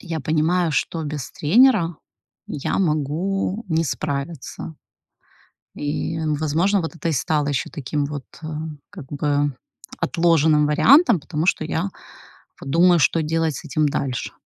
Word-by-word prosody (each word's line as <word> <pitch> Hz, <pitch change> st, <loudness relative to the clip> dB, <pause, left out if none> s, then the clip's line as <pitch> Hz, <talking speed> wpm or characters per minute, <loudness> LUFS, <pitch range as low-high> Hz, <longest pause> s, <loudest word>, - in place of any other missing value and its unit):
Я 165 Hz, -3 st, -4 dB
понимаю, 160 Hz, +4 st, +1 dB
что 160 Hz, +3 st, -1 dB
без 150 Hz, -3 st, -5 dB
тренера 185 Hz, -, +4 dB, 0.5 s
я 145 Hz, -, -2 dB
могу 180 Hz, +6 st, -1 dB
не 160 Hz, 0 st, +1 dB
справиться. 145 Hz, +3 st, -4 dB, 1.0 s
И, 150 Hz, +2 st, -3 dB
возможно, 160 Hz, +6 st, +1 dB
вот 165 Hz, -, -5 dB
это 165 Hz, -, -4 dB
и -, -, 0 dB
стало 150 Hz, +1 st, 0 dB
ещё 135 Hz, -2 st, -2 dB
таким 145 Hz, 0 st, -2 dB
вот, 145 Hz, -2 st, -6 dB, 0.2 s
э, -, -, -5 dB, 0.4 s
как -, -, -9 dB
бы 145 Hz, -1 st, 0 dB, 0.4 s
отложенным 160 Hz, -3 st, +3 dB
вариантом, 240 Hz, -, +5 dB
потому 155 Hz, +1 st, -3 dB
что 160 Hz, -, +2 dB
я 160 Hz, +1 st, -1 dB, 0.8 s
вот -, -, -7 dB
думаю, 175 Hz, +1 st, +5 dB
что 165 Hz, +2 st, +3 dB
делать 160 Hz, -1 st, 0 dB
с -, -, -7 dB
этим 155 Hz, -1 st, +1 dB
дальше. 130 Hz, -2 st, -3 dB
155 Hz, 135 wpm, -22 LUFS, 145-170 Hz, 1.0 s, вариантом